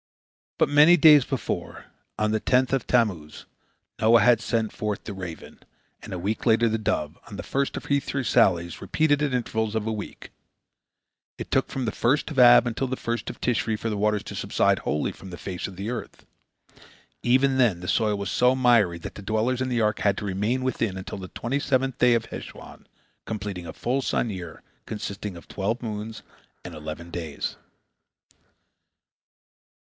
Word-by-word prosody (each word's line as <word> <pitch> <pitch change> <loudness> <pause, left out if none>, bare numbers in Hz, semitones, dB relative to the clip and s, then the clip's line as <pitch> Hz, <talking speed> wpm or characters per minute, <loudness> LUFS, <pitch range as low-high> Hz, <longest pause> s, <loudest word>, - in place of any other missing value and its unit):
But - - +3
many 150 +4 +7
days 150 -5 +7
before, - - -4 0.3
on 105 0 +1
the 110 - +1
tenth 125 +3 +2
of 135 -1 0
Tammuz, 95 -11 0 0.5
Noah 115 +1 +5
had 115 0 +5
sent 115 -2 -1
forth 105 -2 -3
the 105 - -6
raven, 90 -4 -8 0.4
and - - -10
a 90 - -4
week 100 +5 -3
later 115 0 +4
the 110 - 0
dove, 75 -8 -2
on - - -9
the - - -6
first 140 0 -1
of - - -7
her 140 0 +2
three 140 -1 -3
sallies, 90 -8 +2
repeated 150 -2 +1
at 145 -3 0
intervals 110 -3 -1
of 110 0 -1
a - - 0
week. 105 -1 -8 1.1
It - - -6
took - - +2
from 130 -2 -3
the 110 - -1
first 140 +10 +1
of 150 - -7
Ab 120 0 +8
until 120 +3 -2
the 130 - -2
first 120 -1 -3
of - - -9
Tishri 115 -2 0
for 115 - -3
the 105 - -2
waters 105 0 +1
to - - -7
subside - - +1
wholly 75 - -1
from 95 - -12
the 90 - -7
face 95 -1 -5
of 95 - -10
the 100 +3 -4
earth. 120 - -7 1.0
Even 130 +2 +3
then 115 -9 +3
the 90 - -8
soil 105 0 +1
was 100 -3 -4
so 125 +1 +3
miry 120 -9 +3
that - - -8
the - - -8
dwellers 110 +5 0
in 130 - -1
the 120 -2 0
ark 105 -1 +1
had 100 -1 +1
to - - -4
remain 105 +7 -1
within 115 -6 -1
until 95 +1 -6
the 95 - -7
twenty 130 +5 -2
seventh 130 -2 0
day 125 -1 +5
of 115 - -1
Heshwan, - - -10 0.4
completing 100 -5 -5
a - - -7
full 130 +3 -1
sun 120 -3 -1
year, 85 -4 -8 0.3
consisting 105 -2 -5
of 85 - -14
twelve 105 +5 -2
moons 110 -1 -5 0.4
and - - -8
eleven 80 +3 -7
days. 80 -5 -4
110 Hz, 190 wpm, -25 LUFS, 100-125 Hz, 1.1 s, Ab